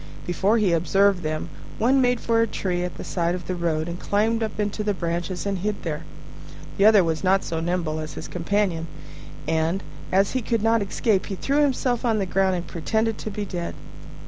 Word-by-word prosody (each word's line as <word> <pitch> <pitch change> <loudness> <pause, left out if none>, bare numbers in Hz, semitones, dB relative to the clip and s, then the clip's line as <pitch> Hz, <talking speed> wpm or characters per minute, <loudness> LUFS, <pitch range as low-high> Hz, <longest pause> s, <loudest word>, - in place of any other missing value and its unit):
Before 195 +5 +2
he 200 -6 +3
observed 195 +3 +3
them, 155 +1 -3 0.3
one 260 +4 +4
made 245 -1 +2
for 230 0 +2
a 230 - +2
tree 180 -4 -2
at 180 - -4
the - - -6
side 170 -1 0
of 180 - -7
the 185 - -2
road, 165 -2 -1
and 170 +1 -5
climbed 220 +3 +1
up 220 -1 -3
into 210 +1 -1
the 205 -1 0
branches 175 +1 -3
and 200 -2 -1
hid 205 +2 -2
there. 155 -3 -4 0.7
The 200 - +5
other 215 -3 +7
was 160 0 -1
not 195 +1 +3
so 165 - -3
nimble 165 -2 -1
as 155 0 -6
his - - -6
companion; 180 -2 -1 0.6
and, 160 +4 0 0.3
as 195 +1 +3
he 260 - 0
could 230 -1 -1
not 225 0 +3
escape, 200 0 0
he 195 - -3
threw 280 +9 +1
himself 255 -4 +1
on 230 -3 +2
the 200 - 0
ground 190 0 +2
and 175 -1 -3
pretended 220 +6 -1
to - - -4
be 205 0 -4
dead. 175 -3 -4
195 Hz, 210 wpm, -24 LUFS, 170-215 Hz, 0.7 s, other